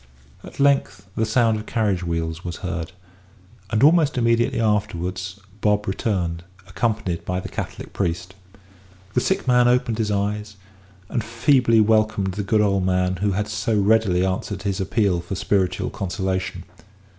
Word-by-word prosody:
At - - -12
length 140 -9 +2
the 110 - 0
sound 115 -1 +3
of 105 - -9
carriage 105 -6 0
wheels 85 -1 -3
was 85 -1 -4
heard; 85 -2 -4 0.8
and 110 +2 +1
almost 155 -2 +5
immediately 115 -1 +2
afterwards 95 -3 -1 0.2
Bob 105 0 +1
returned, 90 -4 -1 0.2
accompanied 95 -3 -2
by 90 +1 -2
the - - -7
Catholic - - -6
priest. 90 +2 -2 0.8
The 125 - +2
sick 190 -3 -1
man 125 -1 +5
opened 125 -2 +1
his 110 -2 0
eyes, 105 +1 -2 0.5
and 115 +1 -2
feebly 115 0 +3
welcomed 110 -3 +2
the 105 - -3
good 105 +2 +2
old 100 -2 +2
man 90 0 +1
who 100 +1 0
had 105 +2 -1
so 105 +3 0
readily 100 -3 +3
answered 95 +1 -3
his 100 -1 -1
appeal 95 -2 +1
for 85 +3 -5
spiritual 95 -1 0
consolation. 95 -1 -3
100 Hz, 150 wpm, -22 LUFS, 90-110 Hz, 0.8 s, almost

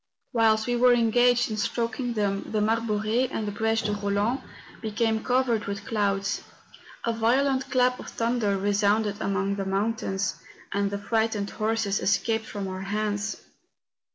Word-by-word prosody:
Whilst 220 -2 +3
we 245 - 0
were 245 +1 +5
engaged 245 +1 +3
in 215 - -2
stroking 235 +3 -1
them 200 -3 -1
the 215 - +1
Mar 220 +2 +2
bore 215 -2 -1
and 225 -1 0
the - - -2
Breche 225 +1 0
de 210 - +1
Roland 205 +5 0 0.4
became 220 0 0
covered 245 -4 +1
with 200 +1 -5
clouds; 200 -3 0 0.6
a 230 - +1
violent 265 +4 +1
clap 250 -1 +2
of - - -8
thunder 230 -4 0
resounded 205 +1 +1
among 195 0 0
the 195 - -2
mountains, 195 -1 -1 0.3
and 200 0 0
the 200 - -3
frightened 220 -1 0
horses 215 -2 0
escaped 220 +3 +1
from 200 -2 -4
our 185 0 -5
hands. 205 +1 -2
220 Hz, 155 wpm, -26 LUFS, 200-230 Hz, 0.6 s, were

